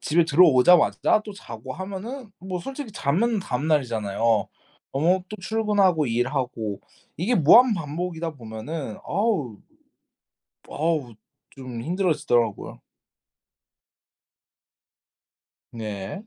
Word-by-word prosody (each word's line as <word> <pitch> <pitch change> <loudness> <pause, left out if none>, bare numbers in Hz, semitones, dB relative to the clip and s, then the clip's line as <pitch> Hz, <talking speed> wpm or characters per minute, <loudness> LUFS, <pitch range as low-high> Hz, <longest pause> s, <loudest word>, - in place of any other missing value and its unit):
집에 170 +3 +2
들어오자마자 165 +4 +5
또 210 - -7
자고 120 - -9
하면은 200 +6 -7
뭐 185 0 -5
솔직히 270 +2 -7
자면 205 +12 +1
다음 140 -5 -3
날이잖아요. 115 -10 -1 0.7
어 170 +7 +2
또 215 - -7
출근하고 200 -5 +2
일하고 120 -3 -2 0.4
이게 200 +10 0
무한 225 - +7
반복이다 165 +1 -4
보면은 115 +2 -6
어으. 185 - -1 1.1
어우. 150 -6 -1 0.4
좀 130 -4 -8
힘들어지더라고요. 150 - 0 2.9
네. 105 - -6
160 Hz, 225 characters per minute, -24 LUFS, 125-190 Hz, 2.9 s, 무한